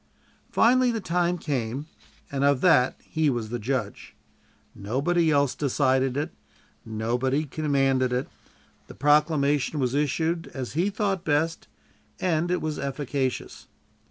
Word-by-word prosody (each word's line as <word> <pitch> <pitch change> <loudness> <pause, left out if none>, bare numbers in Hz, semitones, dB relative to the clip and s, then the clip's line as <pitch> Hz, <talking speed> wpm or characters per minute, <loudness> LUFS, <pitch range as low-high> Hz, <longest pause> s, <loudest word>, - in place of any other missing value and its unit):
Finally 250 +2 +4
the 230 -2 -1
time 175 -1 0
came, 135 -3 -3 0.5
and 140 0 -1
of 140 -2 +3
that 145 -8 +4
he 160 -2 0
was 120 -4 -2
the 120 +1 -3
judge. 130 +4 -3 0.6
Nobody 145 - 0
else 140 -3 +2
decided 135 -2 +1
it; 145 - -2 0.5
nobody 120 +6 -1
commanded 135 -3 +1
it; 125 +2 -1 0.6
the - - -12
proclamation 150 -1 +2
was 125 -2 0
issued 160 +4 0
as 130 -3 -5
he 175 +6 +1
thought 200 -3 -1
best, 155 +2 0 0.5
and 170 -1 0
it 180 0 0
was 155 -1 -3
efficacious. 140 -1 -3
145 Hz, 130 wpm, -26 LUFS, 130-165 Hz, 0.6 s, Finally